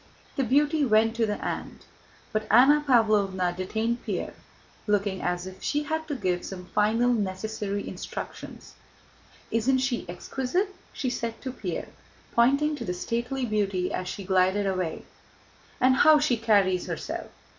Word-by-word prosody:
The 275 - +1
beauty 290 +4 +3
went 225 -2 +3
to 225 -1 +2
the 210 - -2
aunt, - - -5 0.5
but 215 0 -1
Anna 275 +6 +6
Pávlovna 200 -7 +3
detained 220 +6 -2
Pierre, - - -3 0.5
looking 200 -2 +1
as 180 0 -1
if 185 0 -10
she 295 0 0
had 315 +2 -3
to 295 - -2
give 185 -7 -1
some 180 -2 -7
final 220 +6 +2
necessary 205 0 -3
instructions. - - -7 0.8
"Isn't 240 +4 +2
she 260 -7 -1
exquisite?" 265 - -2 0.2
she 255 - -2
said 230 -2 -4
to 260 - -3
Pierre, 195 -9 -5 0.4
pointing 280 +6 +3
to - - -5
the 180 - -3
stately 235 +7 -2
beauty 195 -5 0
as 185 - -3
she 200 +2 -5
glided 190 +2 +2
away. 185 -4 -2 0.7
"And 260 +1 +4
how 310 +2 +7
she 295 -4 +2
carries 200 -5 +2
herself! - - -5
220 Hz, 145 wpm, -27 LUFS, 190-260 Hz, 0.8 s, how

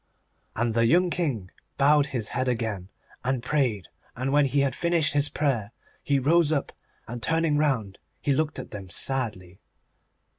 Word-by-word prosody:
And 115 -1 0
the 115 0 +3
young 175 +7 +3
King 130 - -2 0.3
bowed 145 +1 +4
his 120 -6 -3
head 130 - -2
again, 110 -6 -2 0.3
and 125 -1 -1
prayed, 125 - 0 0.3
and 130 +2 -2
when 145 0 +5
he 140 +2 +1
had 135 -2 +1
finished 170 0 +1
his 145 0 +2
prayer 120 -8 -1 0.3
he 140 - +1
rose 155 +4 +3
up, 145 -3 -1 0.4
and 120 +1 -6
turning 160 +2 +1
round 130 -10 0 0.2
he 140 - +1
looked 155 +2 -1
at - - -7
them 100 -3 -8
sadly. 95 -5 -1
135 Hz, 160 wpm, -26 LUFS, 115-150 Hz, 0.4 s, when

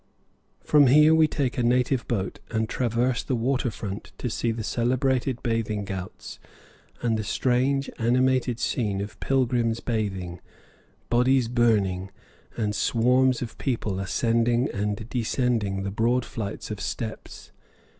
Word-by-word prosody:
From 145 -2 +5
here 150 +4 +6
we 160 -1 +5
take 135 -4 -2
a - - +1
native 125 +1 +1
boat 100 -5 -2
and 110 -1 -1
traverse 120 +1 0
the 130 - -2
water 125 +2 0
front 105 -1 -7
to 125 - -3
see 115 - 0
the 115 0 -4
celebrated 125 +2 0
bathing 110 -4 -1
ghauts 95 -1 -7 0.6
and 115 -2 +1
the - - -2
strange, 130 +5 +1
animated 125 0 +2
scene 105 -7 -1
of 105 +1 -6
pilgrims 120 -3 +1
bathing, 95 -7 -3 0.7
bodies 125 +1 +3
burning, 105 -6 +1 0.5
and 105 -2 0
swarms 125 +4 +2
of 115 - -8
people 110 -7 -2
ascending 115 +6 +1
and 105 +1 -2
descending 115 -5 -1
the 100 - -3
broad 120 +4 +1
flights 110 -1 -5
of 105 -1 -5
steps. 110 +1 -6
115 Hz, 135 wpm, -25 LUFS, 105-125 Hz, 0.7 s, here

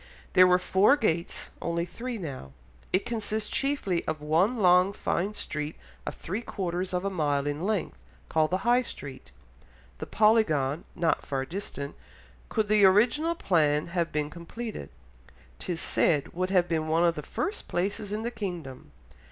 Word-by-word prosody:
There 185 0 +8
were 180 0 +5
four 190 +9 +4
gates, 170 - -1
only 170 0 -1
three 235 +7 -5
now. 135 - -7 0.4
It 185 - +1
consists 215 -2 -2
chiefly 270 -11 0
of 155 -1 -2
one 165 +11 +2
long 180 -1 +5
fine 200 +2 -1
street 150 -3 -3 0.3
of - - -3
three 200 +7 -4
quarters 185 -4 -3
of 180 +1 -1
a 195 - 0
mile 145 -5 0
in 145 +1 -2
length, 215 -4 -2 0.3
called 155 -1 +2
the 185 +4 -2
High 245 +1 +5
Street.... 135 - -8 0.7
The - - -5
Polygon 175 -10 +3
(not 170 -1 +1
far 135 -1 -2
distant) 145 -5 -5 0.6
could 220 -2 0
the 210 -1 +4
original 245 - +4
plan 155 - +2
have 170 -1 -1
been 150 0 -1
completed, 180 - -7 0.7
'tis 175 -3 -3
said, 150 -4 +1
would 185 +2 -1
have 180 -2 +3
been 160 -2 -1
one 165 +2 +2
of 170 - +3
the 150 - -5
first 405 - -4
places 200 +3 -2
in 215 +1 -2
the 235 - -2
kingdom.... 175 - -6
180 Hz, 160 wpm, -28 LUFS, 155-210 Hz, 0.7 s, There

